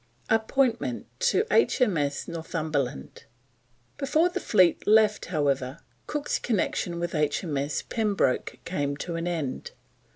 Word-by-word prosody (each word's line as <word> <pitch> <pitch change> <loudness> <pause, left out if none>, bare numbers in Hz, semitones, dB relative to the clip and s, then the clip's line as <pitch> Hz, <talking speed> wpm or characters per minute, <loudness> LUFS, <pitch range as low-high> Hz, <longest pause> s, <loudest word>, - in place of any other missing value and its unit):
APPOINTMENT 230 +2 +1
TO 480 -3 +2
H.M.S. 170 - +2
NORTHUMBERLAND. 155 - -3 0.7
Before 310 +5 +2
the - - -3
fleet 185 -5 +3
left, 215 -1 +4
however, 140 -5 0 0.3
Cook's 295 -1 -1
connection 180 -5 -1
with 170 0 -3
H.M.S. 150 -1 -1
Pembroke 210 - 0
came 145 -5 -2
to 170 +3 -4
an 165 +1 -2
end. 160 -7 -3
170 Hz, 105 wpm, -27 LUFS, 145-220 Hz, 0.7 s, left